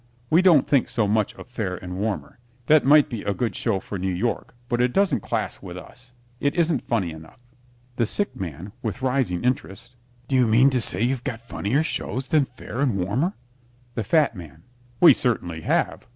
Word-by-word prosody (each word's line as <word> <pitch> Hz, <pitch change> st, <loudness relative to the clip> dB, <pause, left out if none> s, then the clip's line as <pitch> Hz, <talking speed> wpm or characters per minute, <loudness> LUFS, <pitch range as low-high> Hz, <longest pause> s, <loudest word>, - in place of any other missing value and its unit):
We 165 Hz, +3 st, +6 dB
don't 170 Hz, -8 st, +5 dB
think 140 Hz, -4 st, +2 dB
so 110 Hz, -3 st, 0 dB
much 105 Hz, 0 st, 0 dB
of -, -, -10 dB
"Fair 110 Hz, -7 st, -3 dB
and 90 Hz, 0 st, -7 dB
Warmer." 105 Hz, +4 st, -3 dB, 0.3 s
That 155 Hz, +2 st, +5 dB
might 145 Hz, +2 st, +6 dB
be 115 Hz, -4 st, -5 dB
a 100 Hz, -1 st, -2 dB
good 120 Hz, -3 st, -2 dB
show 115 Hz, -7 st, 0 dB
for 100 Hz, 0 st, -6 dB
New 95 Hz, +1 st, -1 dB
York, 115 Hz, +6 st, -2 dB
but 120 Hz, -1 st, 0 dB
it 125 Hz, 0 st, +1 dB
doesn't 200 Hz, -1 st, +2 dB
class 110 Hz, -3 st, -3 dB
with 90 Hz, -2 st, -8 dB
us. 125 Hz, +7 st, -13 dB, 0.3 s
It 140 Hz, -, 0 dB
isn't 165 Hz, -5 st, +1 dB
funny 100 Hz, -8 st, 0 dB
enough. 80 Hz, 0 st, -12 dB, 0.6 s
THE 115 Hz, -, +1 dB
SICK 205 Hz, -, -2 dB
MAN 90 Hz, +1 st, -6 dB
(with 115 Hz, +3 st, -4 dB
rising 125 Hz, -9 st, 0 dB
interest) 125 Hz, -1 st, -3 dB, 0.3 s
Do -, -, -4 dB
you 125 Hz, -2 st, +4 dB
mean 125 Hz, +5 st, +5 dB
to 125 Hz, -2 st, +1 dB
say 100 Hz, -1 st, +1 dB
you've 125 Hz, 0 st, 0 dB
got 115 Hz, -, -4 dB
funnier 125 Hz, +7 st, 0 dB
shows 135 Hz, -4 st, -3 dB
than 150 Hz, -3 st, +3 dB
"Fair 125 Hz, -1 st, -9 dB
and 130 Hz, -8 st, +1 dB
Warmer"? 120 Hz, -, 0 dB, 0.6 s
THE 115 Hz, -, -2 dB
FAT 150 Hz, +2 st, +2 dB
MAN 80 Hz, -3 st, -11 dB, 0.4 s
We 175 Hz, -, +9 dB
certainly 90 Hz, -10 st, -1 dB
have. -, -, -1 dB
120 Hz, 195 wpm, -24 LUFS, 95-135 Hz, 0.6 s, We